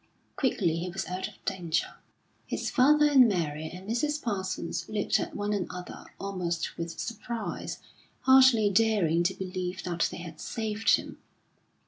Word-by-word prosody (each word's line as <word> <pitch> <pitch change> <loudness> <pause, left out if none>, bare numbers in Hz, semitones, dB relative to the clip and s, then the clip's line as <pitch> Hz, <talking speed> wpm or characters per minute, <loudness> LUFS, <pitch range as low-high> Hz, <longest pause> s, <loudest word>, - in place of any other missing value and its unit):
Quickly 185 - +1
he 175 +2 -3
was 190 +2 -4
out 185 +1 -3
of - - -13
danger. 175 -4 -1 0.5
His - - -2
father 300 +3 +5
and 270 -4 +7
Mary 160 -6 -1
and 185 +2 -10
Mrs. 295 +7 0
Parsons 190 - -3
looked 210 -2 +1
at - - -4
one 205 0 -1
another 180 -2 -5
almost 180 -4 -3
with 170 0 -5
surprise, 230 0 -4 0.4
hardly 260 -6 +6
daring 195 -6 +3
to 175 +2 +1
believe 185 -1 -4
that 170 -2 0
they - - -7
had 165 -3 -9
saved 220 -1 +1
him. - - -7
190 Hz, 145 wpm, -28 LUFS, 175-225 Hz, 0.5 s, and